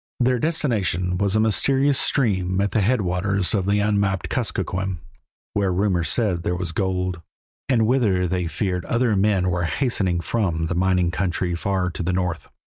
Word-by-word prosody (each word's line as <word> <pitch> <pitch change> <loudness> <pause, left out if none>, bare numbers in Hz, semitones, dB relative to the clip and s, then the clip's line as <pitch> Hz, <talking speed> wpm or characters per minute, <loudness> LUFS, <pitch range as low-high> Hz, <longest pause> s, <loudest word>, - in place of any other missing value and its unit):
Their 125 0 +2
destination 100 - 0
was 100 0 +1
a - - +3
mysterious 135 +6 +2
stream 95 -8 +1
at 100 0 0
the 110 - +1
headwaters 100 -3 +1
of 100 -3 0
the 105 +1 +2
unmapped 100 -3 0
Kuskokwim, 95 0 -2 0.6
where 100 -2 +1
rumor 90 -1 +1
said 95 -2 0
there 90 +1 -1
was 90 -1 -3
gold, 90 -1 -2 0.5
and 115 -4 +3
whither 105 -7 +2
they 90 -1 -1
feared 90 0 -2
other 120 -3 +1
men 95 -2 +2
were 90 0 -1
hastening 95 -6 0
from 85 -3 -1
the 80 - -2
mining 90 -1 +1
country 90 +1 -1
far 90 +1 -1
to 85 - -6
the 90 +2 -1
north. 90 -2 -2
95 Hz, 165 wpm, -22 LUFS, 90-105 Hz, 0.6 s, a